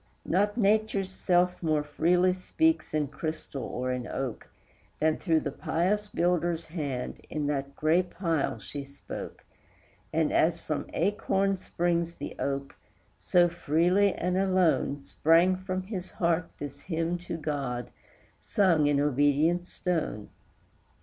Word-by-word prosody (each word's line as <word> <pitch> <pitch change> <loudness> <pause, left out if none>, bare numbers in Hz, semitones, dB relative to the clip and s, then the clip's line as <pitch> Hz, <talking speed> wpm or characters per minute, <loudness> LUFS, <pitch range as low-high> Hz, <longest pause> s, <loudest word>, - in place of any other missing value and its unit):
Not 205 +5 +1
Nature's 210 -3 +2
self 180 -1 +1
more 155 -3 +1
freely 175 +5 +2
speaks 320 - 0
in 150 -2 0
crystal 155 -1 -5
or 125 +1 -3
in 125 -1 -3
oak, 130 -4 -4 0.5
Than, 155 0 +2
through 160 -4 +2
the 145 - -3
pious 190 +9 0
builder's 175 -2 0
hand, 145 -6 -4
in 150 -1 -2
that 140 -1 -2
gray 160 +4 +3
pile 170 -4 -1
she 145 -1 -7
spoke; 140 0 -9 0.7
And - - +1
as - - +3
from - - -4
acorn 195 -1 +1
springs 170 -1 -1
the - - -7
oak, 140 0 -2 0.5
so, 175 -1 +4
freely 175 +4 +2
and 180 +1 -1
alone, 185 -6 +2
Sprang 165 +6 +3
from 185 0 -3
his 185 -2 -5
heart 170 -1 0
this 140 -1 -7
hymn 165 0 -2
to 165 - -3
God, 140 -6 -3 0.5
sung 170 -7 +3
in 145 -1 +3
obedient 145 +5 +2
stone. 160 - -2
165 Hz, 130 wpm, -28 LUFS, 145-185 Hz, 0.7 s, so